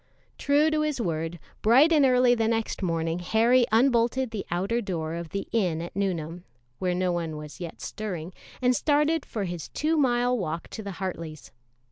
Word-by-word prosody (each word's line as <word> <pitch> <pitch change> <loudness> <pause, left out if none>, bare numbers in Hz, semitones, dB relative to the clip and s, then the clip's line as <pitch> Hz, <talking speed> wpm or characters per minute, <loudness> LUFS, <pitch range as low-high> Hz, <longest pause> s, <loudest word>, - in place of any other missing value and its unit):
True 295 +2 +3
to 310 0 +1
his 300 -3 -1
word, 165 -4 -2 0.2
bright 265 +9 +6
and 300 -3 +5
early 250 -1 +5
the 225 -2 +1
next 225 -1 -1
morning 165 -2 -1
Harry 235 +6 +3
unbolted 240 +1 +2
the 215 -3 -5
outer 195 +7 0
door 165 -6 -3
of 170 -1 -5
the 200 +2 -4
inn 180 -8 +1
at 170 +1 -7
Nuneham, 175 -3 -2 0.4
where 180 -1 0
no 180 0 +1
one 165 -3 -3
was 150 +4 -9
yet 170 -2 -7
stirring, 185 -5 -5 0.3
and 250 0 +4
started 300 +2 +1
for 215 - -3
his 175 -4 -5
two 315 +2 0
mile 245 -3 +2
walk 165 -6 -4
to 220 - -7
the 200 -2 -6
Hartleys'. 165 - -6
200 Hz, 180 wpm, -26 LUFS, 170-245 Hz, 0.4 s, bright